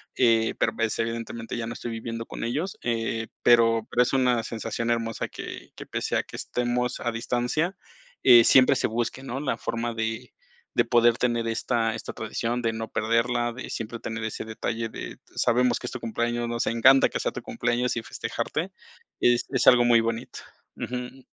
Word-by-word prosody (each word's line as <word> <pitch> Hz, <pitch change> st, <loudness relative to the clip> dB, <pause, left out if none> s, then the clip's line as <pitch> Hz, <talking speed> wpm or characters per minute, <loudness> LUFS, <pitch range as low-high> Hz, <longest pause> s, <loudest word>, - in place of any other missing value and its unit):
eh, 115 Hz, -2 st, +3 dB
pero, 115 Hz, -, +1 dB
pues, 115 Hz, -1 st, -1 dB
evidentemente 115 Hz, 0 st, -3 dB
ya 115 Hz, -1 st, -3 dB
no 115 Hz, -, -4 dB
estoy 120 Hz, -, -6 dB
viviendo 115 Hz, 0 st, -5 dB
con -, -, -7 dB
ellos. 150 Hz, +11 st, -2 dB
Eh, 115 Hz, -1 st, -1 dB, 0.2 s
pero 115 Hz, -2 st, +5 dB
pero 125 Hz, -, +4 dB
es 120 Hz, -, -2 dB
una 125 Hz, -3 st, +2 dB
sensación 115 Hz, +1 st, -3 dB
hermosa 115 Hz, -1 st, -2 dB
que -, -, -8 dB
que, -, -, -8 dB
pese -, -, -2 dB
a -, -, 0 dB
que -, -, -12 dB
estemos 125 Hz, 0 st, -1 dB
a 120 Hz, -, -2 dB
distancia, 125 Hz, +10 st, -1 dB, 0.5 s
eh, 120 Hz, -3 st, +9 dB
siempre 135 Hz, +3 st, +6 dB
se -, -, +1 dB
busque, 120 Hz, +3 st, -3 dB
¿no?, 135 Hz, 0 st, -4 dB
la 145 Hz, -2 st, -1 dB
forma 115 Hz, 0 st, -3 dB
de 110 Hz, +1 st, -4 dB, 0.4 s
de -, -, +3 dB
poder 120 Hz, 0 st, +4 dB
tener 120 Hz, -2 st, 0 dB
esta 115 Hz, 0 st, 0 dB
esta -, -, -6 dB
tradición, 115 Hz, +2 st, -3 dB
de 115 Hz, -1 st, 0 dB
no 110 Hz, 0 st, -5 dB
perderla, 120 Hz, +2 st, +1 dB
de 130 Hz, -, -8 dB
siempre 115 Hz, +1 st, -5 dB
tener 115 Hz, 0 st, -5 dB
ese 110 Hz, -, -4 dB
detalle 115 Hz, +1 st, -3 dB
de -, -, -7 dB, 0.2 s
sabemos 125 Hz, 0 st, +2 dB
que -, -, -6 dB
es -, -, -6 dB
tu 130 Hz, -, -6 dB
cumpleaños, 120 Hz, +1 st, -1 dB
nos 120 Hz, 0 st, -1 dB
encanta 130 Hz, +4 st, +6 dB
que -, -, -4 dB
sea -, -, -1 dB
tu -, -, -6 dB
cumpleaños 120 Hz, +1 st, -1 dB
y 120 Hz, -, -3 dB
festejarte, -, -, -4 dB, 0.5 s
es 120 Hz, 0 st, +3 dB
es 130 Hz, -2 st, 0 dB
algo 125 Hz, -1 st, +8 dB
muy 120 Hz, -1 st, +6 dB
bonito 115 Hz, 0 st, -4 dB, 0.4 s
Ujú. 125 Hz, +1 st, -5 dB
115 Hz, 190 wpm, -26 LUFS, 115-125 Hz, 0.5 s, eh